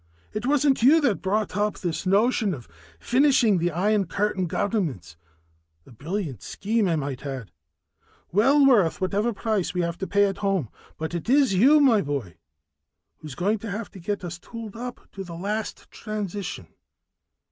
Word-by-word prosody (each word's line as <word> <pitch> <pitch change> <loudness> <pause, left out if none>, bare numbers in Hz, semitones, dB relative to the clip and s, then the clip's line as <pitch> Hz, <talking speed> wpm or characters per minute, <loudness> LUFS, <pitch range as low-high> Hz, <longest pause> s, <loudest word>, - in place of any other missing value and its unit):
It 215 +3 -3
wasn't 280 -2 +3
you 285 +7 +6
that 245 -9 +1
thought 205 +1 -1
up 210 0 0
this 175 0 -3
notion 205 0 +2
of 120 -5 -12 0.3
finishing 245 -6 +3
the 175 +1 +1
Iron 195 +3 +1
Curtain 200 -1 -1
governments 155 - -2 0.7
a - - -17
brilliant 155 - -4
scheme, 215 0 -1
I 170 - +1
might 140 -3 -4
add, 130 - -6 0.8
well 270 +9 +4
worth 210 -11 +4
whatever 205 +5 0
price 215 -4 -2
we 180 - +1
have 170 0 -3
to 190 - -3
pay 205 0 +3
at 195 -1 -2
home. 195 - 0 0.3
"But 160 +2 -4
it 170 +6 -4
is 270 -4 +4
you, 265 +11 +6
my 245 -8 +5
boy, 135 - -4 0.8
who's 150 -3 -9
going 205 +5 0
to 225 - -6
have 210 +2 -5
to 195 - -11
get 200 +3 -3
us 175 0 -6
tooled 230 -1 -9
up 245 +1 -6
to 195 - -8
last 205 +5 -3
the - - -21
transition. 205 - -5
200 Hz, 170 wpm, -25 LUFS, 170-225 Hz, 0.8 s, you